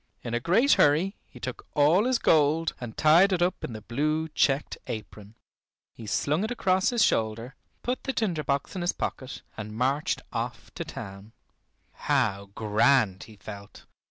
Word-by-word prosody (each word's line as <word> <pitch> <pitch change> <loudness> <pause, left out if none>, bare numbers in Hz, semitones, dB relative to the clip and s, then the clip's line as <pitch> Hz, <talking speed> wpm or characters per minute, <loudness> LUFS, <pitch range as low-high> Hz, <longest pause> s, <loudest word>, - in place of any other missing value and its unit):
In 120 - -5
a 120 - +1
great 210 - +3
hurry 165 +8 +3
he 125 - -14
took 130 0 -6
all 155 +8 +4
his 255 -1 +2
gold 160 -1 +3
and 115 -3 -7
tied 170 +6 +5
it 175 -2 +2
up 180 0 -1
in 120 - -4
the 110 -1 -8
blue 155 +7 -1
checked 145 -1 0
apron. 105 -1 -8 0.6
He 115 - -10
slung 150 - 0
it 220 - -2
across 190 -6 +1
his 240 -3 +2
shoulder, 115 +3 -1 0.3
put 250 +1 -3
the 270 - 0
tinder 185 -11 -1
box 140 -1 -1
in 185 - -3
his 175 - 0
pocket, 130 0 -5
and 110 0 -7
marched 135 +4 0
off - - -5
to - - -4
town. 100 +3 -9 0.6
How 110 -9 0
grand 110 -2 +2
he 110 - -14
felt! 100 +1 -11
140 Hz, 170 wpm, -27 LUFS, 110-175 Hz, 0.6 s, tied